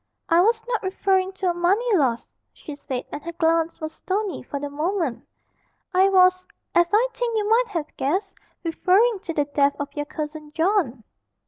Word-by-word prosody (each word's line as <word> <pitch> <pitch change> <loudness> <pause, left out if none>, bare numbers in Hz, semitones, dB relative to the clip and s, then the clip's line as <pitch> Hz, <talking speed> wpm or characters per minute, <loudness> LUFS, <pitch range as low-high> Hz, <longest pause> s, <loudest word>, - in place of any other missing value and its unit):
'I 335 +1 +5
was 450 +3 +2
not 475 -3 -1
referring 380 0 +1
to 380 -1 0
a - - -3
money 395 +7 +2
loss,' 255 -8 +1 0.2
she 300 - -9
said, 265 -3 -5
and 295 - -5
her 340 +2 -7
glance 330 0 +1
was 315 0 -5
stony 390 +2 -3
for 280 +3 -5
the 290 - -4
moment; 310 -1 -2 0.7
'I 380 +2 +5
was 365 -1 +4 0.3
(as 345 0 +4
I 450 +4 +4
think 470 -2 -1
you 420 -1 0
might 470 +3 +3
have 330 -7 -5
guessed) 370 +9 -1 0.3
referring 385 +6 +2
to 365 -4 -6
the 290 - +2
death 285 0 +1
of 285 0 -5
your 290 0 -3
cousin 300 0 -6
John.' 325 - +1
345 Hz, 185 wpm, -23 LUFS, 300-395 Hz, 0.7 s, I